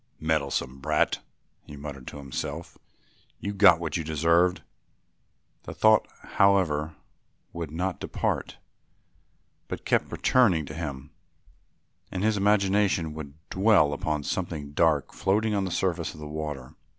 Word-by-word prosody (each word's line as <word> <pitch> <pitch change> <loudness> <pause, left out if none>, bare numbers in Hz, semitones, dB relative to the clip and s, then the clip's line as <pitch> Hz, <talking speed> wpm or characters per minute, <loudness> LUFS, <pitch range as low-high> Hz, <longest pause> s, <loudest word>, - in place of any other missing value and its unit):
"Meddlesome 70 -4 -1
brat," 75 +2 +1 0.5
he 75 - -10
muttered 70 -3 -8
to - - -7
himself, 70 -2 -5 0.6
"you 100 - -4
got 100 -4 +6
what 80 -2 -2
you 85 - -3
deserved." 85 +4 +2 1.0
The - - -7
thought, 110 -1 +4 0.2
however, 85 -6 +2 0.6
would 85 -3 -5
not 90 +4 -3
depart - - -2 1.1
but - - -6
kept - - +1
returning 100 - +3
to 75 - -8
him, 75 -4 -6 1.0
and 95 +1 -3
his 110 0 +2
imagination 100 -4 +2
would 75 -2 -8 0.2
dwell 95 -7 +4
upon 75 0 -2
something 75 -3 -3
dark 75 -2 +2
floating 105 +3 +1
on 100 -2 0
the - - -3
surface 90 0 -1
of - - -12
the 75 - -7
water. 75 -4 -5
80 Hz, 130 wpm, -27 LUFS, 75-95 Hz, 1.1 s, got